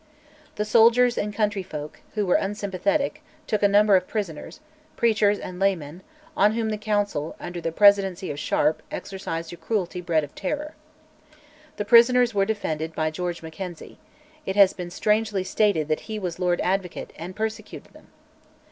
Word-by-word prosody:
The 210 Hz, -, -1 dB
soldiers 235 Hz, +3 st, +5 dB
and 210 Hz, -, -2 dB
countryfolk, 195 Hz, -8 st, -3 dB, 0.2 s
who 210 Hz, -1 st, 0 dB
were 180 Hz, -, +2 dB
unsympathetic, 205 Hz, +9 st, -1 dB, 0.2 s
took 215 Hz, -2 st, -1 dB
a 205 Hz, -, +5 dB
number 205 Hz, 0 st, +5 dB
of 185 Hz, -1 st, +1 dB
prisoners, 195 Hz, -, -5 dB, 0.4 s
preachers 215 Hz, -3 st, +2 dB
and 180 Hz, -2 st, -8 dB
laymen, 180 Hz, -4 st, -1 dB, 0.3 s
on 210 Hz, +2 st, +4 dB
whom 225 Hz, -1 st, -1 dB
the 210 Hz, -, -3 dB
Council, 205 Hz, -8 st, -1 dB
under 175 Hz, 0 st, -6 dB
the 165 Hz, -, -2 dB
presidency 195 Hz, -2 st, +4 dB
of 145 Hz, -, -6 dB
Sharp, 150 Hz, +1 st, +1 dB
exercised 165 Hz, -4 st, -5 dB
a -, -, -9 dB
cruelty 185 Hz, -4 st, -2 dB
bred 165 Hz, -3 st, +1 dB
of 145 Hz, -, -9 dB
terror. 300 Hz, +9 st, -4 dB, 1.0 s
The 210 Hz, -, -2 dB
prisoners 240 Hz, +2 st, +6 dB
were 195 Hz, -1 st, +2 dB
defended 160 Hz, -7 st, -3 dB
by 155 Hz, 0 st, 0 dB
George 175 Hz, +1 st, -4 dB
Mackenzie: 170 Hz, +1 st, -8 dB, 0.4 s
it 190 Hz, -, -3 dB
has 200 Hz, -2 st, +6 dB
been 180 Hz, -1 st, -6 dB
strangely 210 Hz, +1 st, 0 dB
stated 185 Hz, -6 st, +1 dB
that 155 Hz, -1 st, 0 dB
he 215 Hz, -, -3 dB
was 180 Hz, -5 st, -4 dB
Lord 180 Hz, -1 st, +1 dB
Advocate, 185 Hz, -1 st, -2 dB
and 175 Hz, +3 st, -8 dB
persecuted 220 Hz, 0 st, -5 dB
them! -, -, -18 dB
195 Hz, 160 wpm, -24 LUFS, 175-215 Hz, 1.0 s, prisoners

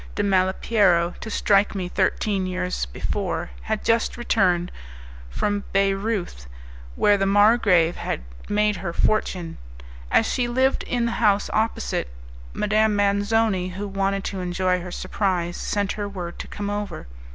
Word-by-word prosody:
de 205 Hz, -, 0 dB
Malipiero 185 Hz, -2 st, +2 dB
to 220 Hz, -, -7 dB
strike 205 Hz, -1 st, +2 dB
me 185 Hz, -2 st, -2 dB
thirteen 190 Hz, +1 st, 0 dB
years 180 Hz, -, -2 dB
before, -, -, -3 dB
had 215 Hz, -, -3 dB
just 230 Hz, +1 st, +1 dB
returned 180 Hz, -7 st, +1 dB, 0.6 s
from 205 Hz, -, -1 dB
Bayreuth, 195 Hz, -, -1 dB, 0.5 s
where 205 Hz, -1 st, +3 dB
the 195 Hz, -, +1 dB
margrave 200 Hz, -5 st, +4 dB
had -, -, -3 dB, 0.3 s
made 210 Hz, -1 st, +2 dB
her 170 Hz, -1 st, -4 dB
fortune. 180 Hz, -6 st, -1 dB, 0.5 s
As 225 Hz, -, +4 dB
she 245 Hz, +1 st, 0 dB
lived 260 Hz, +2 st, +1 dB
in 240 Hz, -1 st, 0 dB
the 235 Hz, -, 0 dB
house 205 Hz, -2 st, +3 dB
opposite, 220 Hz, -, -1 dB, 0.4 s
Madame 215 Hz, 0 st, +2 dB
Manzoni, 205 Hz, -2 st, +1 dB
who 200 Hz, +2 st, -4 dB
wanted 195 Hz, 0 st, -1 dB
to 195 Hz, -, -4 dB
enjoy 180 Hz, 0 st, 0 dB
her 180 Hz, 0 st, -7 dB
surprise, 175 Hz, -3 st, -1 dB
sent 200 Hz, -1 st, -1 dB
her 205 Hz, -1 st, -4 dB
word 175 Hz, -3 st, -7 dB
to -, -, -6 dB
come 205 Hz, 0 st, -4 dB
over. 205 Hz, -, -4 dB
200 Hz, 140 wpm, -23 LUFS, 180-210 Hz, 0.6 s, margrave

